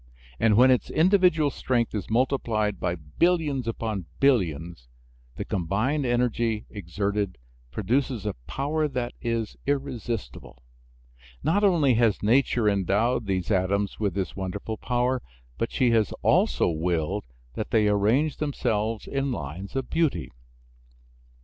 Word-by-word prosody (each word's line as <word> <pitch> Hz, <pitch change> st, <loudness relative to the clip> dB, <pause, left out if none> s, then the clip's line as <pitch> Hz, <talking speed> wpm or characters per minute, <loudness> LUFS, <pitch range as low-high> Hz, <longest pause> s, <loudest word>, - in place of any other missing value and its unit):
And 105 Hz, -2 st, +4 dB
when 130 Hz, +2 st, +7 dB
its 125 Hz, -, +1 dB
individual 175 Hz, -4 st, +3 dB
strength 120 Hz, -4 st, -1 dB
is 105 Hz, -4 st, -4 dB
multiplied 110 Hz, -5 st, 0 dB
by 90 Hz, -1 st, -1 dB
billions 140 Hz, -, 0 dB
upon 110 Hz, -6 st, -3 dB
billions 85 Hz, -, +1 dB, 0.5 s
the -, -, -5 dB
combined 110 Hz, -, 0 dB
energy 120 Hz, -2 st, 0 dB
exerted 100 Hz, -, -2 dB, 0.3 s
produces 115 Hz, -, -1 dB
a 105 Hz, -, -1 dB
power 150 Hz, -, -1 dB
that 125 Hz, -3 st, -3 dB
is 115 Hz, -3 st, -2 dB
irresistible. 120 Hz, -, -4 dB, 0.8 s
Not 200 Hz, +6 st, +2 dB
only 165 Hz, -10 st, +4 dB
has 115 Hz, -3 st, +2 dB
nature 120 Hz, 0 st, +3 dB
endowed 105 Hz, +4 st, +1 dB
these 95 Hz, +1 st, -1 dB
atoms 100 Hz, +1 st, 0 dB
with 100 Hz, -3 st, -1 dB
this 95 Hz, -3 st, -3 dB
wonderful 100 Hz, +3 st, -4 dB
power, 125 Hz, +2 st, 0 dB, 0.4 s
but 115 Hz, -, -1 dB
she 125 Hz, -3 st, +2 dB
has 110 Hz, -3 st, +2 dB
also -, -, +3 dB
willed 80 Hz, -1 st, -1 dB, 0.3 s
that 105 Hz, -, -4 dB
they 110 Hz, -3 st, +3 dB
arrange 110 Hz, +9 st, +2 dB
themselves 115 Hz, -7 st, -1 dB
in 135 Hz, 0 st, -2 dB
lines 90 Hz, -, -6 dB
of 135 Hz, -1 st, -3 dB
beauty. 160 Hz, -4 st, 0 dB
115 Hz, 125 wpm, -26 LUFS, 100-135 Hz, 0.8 s, when